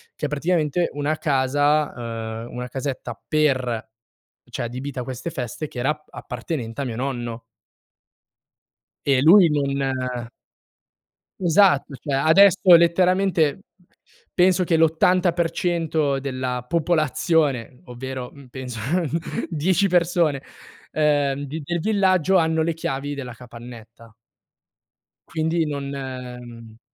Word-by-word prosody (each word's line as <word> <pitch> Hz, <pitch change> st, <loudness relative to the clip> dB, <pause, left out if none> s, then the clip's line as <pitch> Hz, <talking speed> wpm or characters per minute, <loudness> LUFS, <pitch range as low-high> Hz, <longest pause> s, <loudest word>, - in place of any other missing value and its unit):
che -, -, -4 dB
è -, -, -9 dB
praticamente 160 Hz, +2 st, 0 dB
una 145 Hz, +2 st, -1 dB
casa, 130 Hz, -5 st, 0 dB
uhm, -, -, -13 dB
una 125 Hz, 0 st, -4 dB
casetta 135 Hz, 0 st, -5 dB
per 130 Hz, -7 st, 0 dB, 0.6 s
cioè -, -, -4 dB
adibita 130 Hz, +2 st, -5 dB
a -, -, -4 dB
queste 130 Hz, +5 st, -5 dB
feste 130 Hz, +4 st, -5 dB
che 125 Hz, -, -8 dB
era 130 Hz, +4 st, 0 dB
ap 150 Hz, 0 st, -8 dB
appartenente 125 Hz, -1 st, -6 dB
a -, -, -2 dB
mio 115 Hz, -3 st, -4 dB
nonno. 120 Hz, -3 st, -4 dB, 1.6 s
E 135 Hz, -2 st, +3 dB
lui 175 Hz, +3 st, +7 dB
non 145 Hz, -2 st, 0 dB, 1.7 s
Esatto, 175 Hz, -5 st, +3 dB
cioè 140 Hz, +2 st, -4 dB
adesso 185 Hz, +7 st, +6 dB, 0.2 s
letteralmente 180 Hz, -1 st, +3 dB, 0.7 s
penso 185 Hz, 0 st, +4 dB
che 165 Hz, -1 st, +2 dB
l'80% 165 Hz, -2 st, +1 dB
della 130 Hz, -2 st, -3 dB
popolazione, 155 Hz, -5 st, +1 dB
ovvero, 125 Hz, 0 st, -6 dB
mhmm, 140 Hz, -1 st, -14 dB
penso 125 Hz, -3 st, -7 dB, 0.7 s
10 180 Hz, +4 st, +1 dB
persone, 170 Hz, -5 st, +2 dB, 0.5 s
ehm, 145 Hz, -2 st, +1 dB
di 150 Hz, +3 st, -6 dB
del 175 Hz, +4 st, -2 dB
villaggio 190 Hz, -2 st, +2 dB
hanno 160 Hz, -1 st, +2 dB
le 165 Hz, +1 st, -1 dB
chiavi 145 Hz, -2 st, -3 dB
della 130 Hz, -4 st, -7 dB
capannetta. 115 Hz, -1 st, -13 dB, 1.2 s
Quindi 160 Hz, 0 st, 0 dB
non 140 Hz, -1 st, -4 dB
ehm 125 Hz, -4 st, -8 dB
145 Hz, 110 wpm, -23 LUFS, 125-165 Hz, 1.7 s, lui